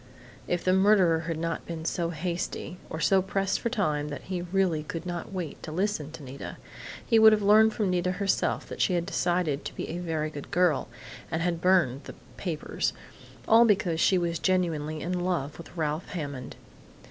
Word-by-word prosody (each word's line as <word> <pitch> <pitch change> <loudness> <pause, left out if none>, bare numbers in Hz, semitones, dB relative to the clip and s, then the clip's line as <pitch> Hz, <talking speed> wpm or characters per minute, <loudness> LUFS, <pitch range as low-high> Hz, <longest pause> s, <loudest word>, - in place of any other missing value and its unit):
If 175 -1 -1
the 185 - +3
murderer 190 -4 +4
had 165 -2 -2
not 165 +1 -3
been 165 -1 -5
so 170 0 -1
hasty 170 +1 -4
or 160 - -5
so 190 +3 +4
pressed 195 +1 -1
for 235 - -1
time 150 -11 0
that 145 - -6
he 180 -2 -3
really 180 -3 +1
could 165 +2 -6
not 175 0 -5
wait 180 -6 -5
to 160 - -7
listen 175 -4 -1
to 160 -2 -9
Nita 135 +1 -8 0.5
he 225 -3 +4
would 220 0 +9
have 210 -1 +1
learned 215 +2 +6
from 205 -4 0
Nita 180 0 +1
herself 195 +1 0
that - - -5
she 185 - +3
had 170 -1 0
decided 175 -6 0
to - - -6
be - - -5
a 170 - -4
very 160 -3 -2
good 145 -2 -8
girl, 175 -5 +2 0.4
and 160 0 -1
had 170 -1 -1
burned 175 -8 +3
the - - -9 0.2
'papers' 170 -5 -2 0.5
all 225 +1 +7
because 195 -7 +2
she 185 - +4
was 170 -1 -1
genuinely 155 -5 0
in 180 +2 -2
love 165 -5 -1
with 170 - -11
Ralph 155 +1 -1
Hammond.... 140 -7 -5
175 Hz, 195 wpm, -28 LUFS, 160-190 Hz, 0.5 s, would